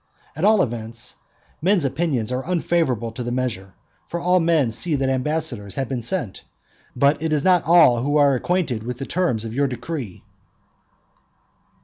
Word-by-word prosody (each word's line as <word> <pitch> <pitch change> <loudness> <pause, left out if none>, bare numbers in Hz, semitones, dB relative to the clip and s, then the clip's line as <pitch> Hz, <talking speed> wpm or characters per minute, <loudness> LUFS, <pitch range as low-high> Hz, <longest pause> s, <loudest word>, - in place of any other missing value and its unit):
At 155 - -5
all 210 -2 +5
events, 115 0 -6 0.4
men's 180 -2 +2
opinions 135 -6 -1
are 130 +1 -2
unfavourable 160 -10 0
to 115 - -7
the 120 0 -3
measure; 115 -7 -3 0.3
for 170 - -4
all 180 +1 +3
men 165 -8 +2
see 160 +7 -1
that 135 -1 0
ambassadors 130 -6 -2
have 135 -2 -2
been 130 -3 -2
sent, 115 - -3 0.5
but 140 +3 +2
it 160 -1 -1
is 150 -2 +1
not 180 -2 +4
all 155 -8 +6
who 145 +4 +1
are 140 -1 +5
acquainted 140 -4 -1
with 120 +2 -5
the 135 - -5
terms 135 -12 0
of 110 - -6
your 140 +3 +1
decree. 130 - -6
135 Hz, 165 wpm, -22 LUFS, 120-165 Hz, 0.5 s, all